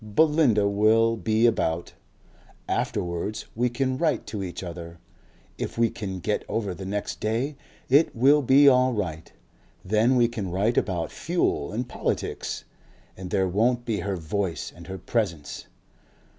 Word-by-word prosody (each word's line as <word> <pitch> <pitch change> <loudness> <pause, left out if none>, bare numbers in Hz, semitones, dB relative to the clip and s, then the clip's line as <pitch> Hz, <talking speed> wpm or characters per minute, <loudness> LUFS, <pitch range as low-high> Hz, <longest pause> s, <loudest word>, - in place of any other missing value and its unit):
Belinda 120 -2 +3
will 110 +3 +3
be 110 +1 +1
about.... 85 -7 0 0.7
Afterwards 85 +5 -2
we 125 +2 +1
can 130 +1 -1
write 165 -2 +1
to 105 - -5
each 90 0 -6
other.... 85 -1 -8 0.6
If - - -4
we 115 -1 +3
can 95 -3 -5
get 105 - -1
over 105 -5 -1
the 95 +1 -7
next 105 +1 -3
day 120 +7 -1 0.3
it 145 +5 +4
will 140 +5 +5
be 140 +2 +6
all 130 -1 +5
right. 85 -7 -4 0.5
Then 110 +6 +3
we 120 -1 +4
can 110 -5 -4
write 100 +7 +1
about 90 -5 -1
fuel 160 - -1
and 120 +4 -3
politics - - -3 0.5
and 90 -1 -7
there 95 0 +1
won't 120 +6 +1
be 110 -4 -1
her 100 -1 -2
voice 85 +2 -3
and 85 0 -12
her 95 - -5
presence. 85 -11 -3
110 Hz, 150 wpm, -25 LUFS, 95-120 Hz, 0.7 s, be